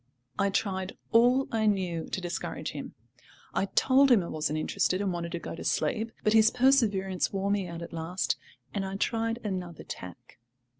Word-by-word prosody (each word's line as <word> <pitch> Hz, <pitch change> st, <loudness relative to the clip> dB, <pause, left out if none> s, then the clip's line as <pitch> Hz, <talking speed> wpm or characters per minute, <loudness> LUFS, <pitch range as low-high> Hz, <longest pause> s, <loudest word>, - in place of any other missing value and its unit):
I 200 Hz, -, +3 dB
tried 190 Hz, -1 st, -2 dB
all 245 Hz, +3 st, +5 dB
I 220 Hz, -1 st, +1 dB
knew 180 Hz, -5 st, 0 dB
to -, -, -2 dB
discourage 175 Hz, -1 st, -4 dB
him. -, -, -7 dB, 0.6 s
I -, -, +1 dB
told 270 Hz, +7 st, +4 dB
him 230 Hz, -7 st, +5 dB
I 170 Hz, -, -6 dB
wasn't 155 Hz, 0 st, -1 dB
interested 185 Hz, +3 st, 0 dB
and 195 Hz, -2 st, 0 dB
wanted 170 Hz, -1 st, -4 dB
to -, -, -1 dB
go -, -, -6 dB
to 165 Hz, -, -7 dB
sleep; 225 Hz, -1 st, 0 dB
but 215 Hz, -, +3 dB
his 220 Hz, 0 st, +7 dB
perseverance 220 Hz, -8 st, +2 dB
wore 195 Hz, 0 st, -1 dB
me 200 Hz, -2 st, 0 dB
out 170 Hz, 0 st, -6 dB
at 170 Hz, -, -9 dB
last, 165 Hz, +3 st, -1 dB, 0.4 s
and 200 Hz, -, -1 dB
I 190 Hz, 0 st, -4 dB
tried 225 Hz, +2 st, 0 dB
another 180 Hz, -5 st, -4 dB
tack. 90 Hz, +5 st, -10 dB
195 Hz, 185 wpm, -29 LUFS, 175-225 Hz, 0.6 s, his